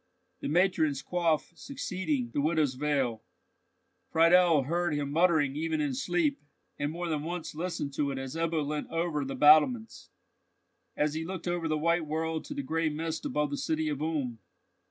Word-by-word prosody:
"The -, -, -4 dB
matron's 155 Hz, -4 st, +2 dB
coif 170 Hz, -1 st, 0 dB
succeeding 170 Hz, -, -3 dB
the 145 Hz, -, +1 dB
widow's 155 Hz, -3 st, +1 dB
veil," 130 Hz, -5 st, -1 dB, 0.9 s
Friedel 165 Hz, -2 st, +5 dB
heard 170 Hz, +2 st, 0 dB
him 145 Hz, -1 st, -2 dB
muttering 160 Hz, -4 st, +3 dB
even 160 Hz, +1 st, -1 dB
in 145 Hz, -3 st, 0 dB
sleep, 150 Hz, +1 st, 0 dB, 0.4 s
and 145 Hz, +1 st, -1 dB
more 175 Hz, +2 st, -4 dB
than 155 Hz, -3 st, -1 dB
once 170 Hz, +1 st, -5 dB
listened 160 Hz, -3 st, -3 dB
to 140 Hz, 0 st, 0 dB
it 135 Hz, -, -3 dB
as 135 Hz, +2 st, -5 dB
Ebbo 165 Hz, -2 st, 0 dB
leant 150 Hz, 0 st, -3 dB
over 165 Hz, -3 st, -1 dB
the 135 Hz, -, -4 dB
battlements—as 155 Hz, -, +1 dB
he 160 Hz, +1 st, -3 dB
looked 185 Hz, +1 st, -6 dB
over 175 Hz, -1 st, -1 dB
the 155 Hz, -1 st, 0 dB
white 170 Hz, +1 st, +1 dB
world 160 Hz, +1 st, -2 dB
to 290 Hz, -, -7 dB
the 285 Hz, -, -3 dB
gray 165 Hz, -4 st, 0 dB
mist 160 Hz, +1 st, -4 dB
above 150 Hz, -1 st, -1 dB
the 145 Hz, -, -2 dB
city 160 Hz, -1 st, -1 dB
of 145 Hz, -1 st, -3 dB
Ulm. 145 Hz, -7 st, -2 dB
155 Hz, 170 wpm, -29 LUFS, 145-170 Hz, 0.9 s, Friedel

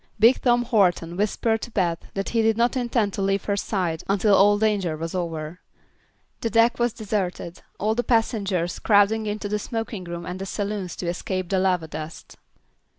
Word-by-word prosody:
Big 230 Hz, +5 st, +5 dB
Tom 240 Hz, -1 st, +3 dB
Horton 180 Hz, -7 st, +2 dB
whispered 215 Hz, +3 st, 0 dB
to -, -, -6 dB
Beth 175 Hz, -6 st, -1 dB
that 195 Hz, 0 st, -2 dB
he 230 Hz, -, +1 dB
did 220 Hz, 0 st, +2 dB
not 240 Hz, +3 st, +2 dB
intend 235 Hz, -5 st, 0 dB
to -, -, -3 dB
leave 195 Hz, 0 st, +1 dB
her 200 Hz, -, 0 dB
side 180 Hz, -5 st, -2 dB
until 200 Hz, +1 st, +3 dB
all 205 Hz, +1 st, +5 dB
danger 205 Hz, -7 st, 0 dB
was 165 Hz, +1 st, -5 dB
over. 165 Hz, -2 st, -4 dB, 0.8 s
The 230 Hz, -, -1 dB
deck 230 Hz, +2 st, +3 dB
was 240 Hz, 0 st, +2 dB
deserted, 195 Hz, -5 st, -3 dB, 0.2 s
all 215 Hz, +2 st, +1 dB
the 245 Hz, +2 st, -1 dB
passengers 200 Hz, -7 st, 0 dB
crowding 215 Hz, +1 st, +3 dB
into 210 Hz, 0 st, -3 dB
the 210 Hz, +1 st, -1 dB
smoking 225 Hz, -4 st, -4 dB
room 170 Hz, 0 st, -6 dB
and 180 Hz, +1 st, -6 dB
saloons 200 Hz, -3 st, -3 dB
to 175 Hz, -, -5 dB
escape 185 Hz, +1 st, -3 dB
the 190 Hz, -, +1 dB
lava 180 Hz, -3 st, +1 dB
dust. 155 Hz, +1 st, -8 dB
200 Hz, 180 wpm, -24 LUFS, 180-220 Hz, 0.8 s, Big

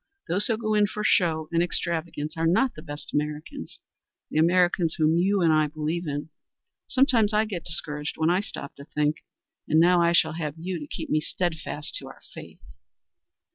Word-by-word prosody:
Those 190 Hz, +5 st, +2 dB
who 225 Hz, -, +1 dB
go 215 Hz, -1 st, -1 dB
in 210 Hz, -1 st, +4 dB
for 210 Hz, +1 st, -5 dB
show 160 Hz, -6 st, +2 dB
and 170 Hz, 0 st, +2 dB
extravagance 165 Hz, -3 st, -2 dB
are 165 Hz, 0 st, +1 dB
not 240 Hz, +10 st, +3 dB
the -, -, -10 dB
best 145 Hz, -2 st, -9 dB
Americans 150 Hz, +1 st, -4 dB, 0.5 s
the 155 Hz, -, +1 dB
Americans 175 Hz, 0 st, +3 dB
whom 155 Hz, 0 st, +3 dB
you 190 Hz, +3 st, +2 dB
and 165 Hz, -2 st, +4 dB
I 155 Hz, -1 st, +3 dB
believe 155 Hz, +3 st, -3 dB
in. 145 Hz, +2 st, -4 dB, 0.6 s
Sometimes 245 Hz, -6 st, +3 dB
I 215 Hz, +1 st, +3 dB
get 195 Hz, -6 st, -5 dB
discouraged 150 Hz, -3 st, -3 dB
when 160 Hz, +1 st, +2 dB
I 180 Hz, -, +3 dB
stop -, -, -8 dB
to 140 Hz, -, -10 dB
think, 150 Hz, 0 st, 0 dB, 0.5 s
and 155 Hz, -, +4 dB
now 175 Hz, +1 st, +5 dB
I 170 Hz, 0 st, +3 dB
shall 160 Hz, -2 st, +3 dB
have 155 Hz, -3 st, -4 dB
you 175 Hz, +1 st, -4 dB
to 150 Hz, -, -8 dB
keep -, -, -6 dB
me 155 Hz, -, +2 dB
steadfast 160 Hz, -3 st, -3 dB
to -, -, -10 dB
our -, -, -13 dB
faith." -, -, -11 dB
165 Hz, 190 wpm, -26 LUFS, 155-185 Hz, 0.6 s, now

